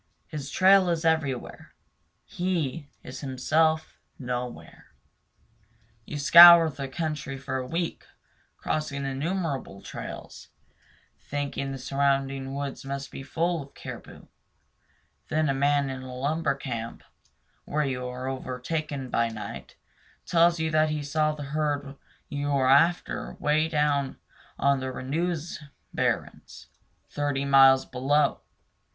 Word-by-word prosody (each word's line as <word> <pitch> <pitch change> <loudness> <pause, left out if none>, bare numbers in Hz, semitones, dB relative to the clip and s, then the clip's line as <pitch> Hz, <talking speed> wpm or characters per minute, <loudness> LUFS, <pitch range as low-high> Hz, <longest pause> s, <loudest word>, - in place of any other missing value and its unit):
His 145 -2 -6
trail 190 +2 +5
is 165 -1 -1
everywhere; 155 -6 -1 0.5
he 165 -5 -2
is 130 +1 -8
himself 155 +4 0 0.2
nowhere. 125 -1 -6 1.2
You 150 - -6
scour 170 +2 +9
the 140 -1 -6
country 150 -1 -4
for 135 0 -4
a 130 -1 -4
week, 165 +4 -3 0.5
crossing 145 -3 -3
innumerable 140 - -3
trails, - - -8 0.7
thinking 140 -1 -4
the 135 - -5
surrounding 135 0 -1
woods 140 -1 -5
must 140 0 -5
be - - -7
full 165 +4 -1
of 140 0 -13
caribou; - - -10 1.0
then 155 -1 +1
a - - +2
man 140 +1 +2
in 130 0 -6
a 130 -1 -8
lumber 145 +2 0
camp, 115 -4 -6 0.6
where 150 0 -1
you 125 -2 -3
are 125 +1 -6
overtaken 135 +1 -4
by 115 0 +1
night, 105 -2 -8 0.5
tells 170 0 +3
you 160 0 -1
that 155 0 +3
he 150 -1 -2
saw 155 +2 +1
the 150 - -7
herd 145 -2 -1 0.3
you 145 0 -3
are 135 -2 +2
after 165 +6 +2
'way 155 +2 +1
down 150 -3 0 0.4
on 140 -1 +2
the 130 - -4
Renous 160 +6 -3 0.3
barrens, - - -3 0.4
thirty 145 -1 -2
miles 135 -1 +6
below. 140 +2 +1
140 Hz, 120 wpm, -26 LUFS, 135-155 Hz, 1.2 s, scour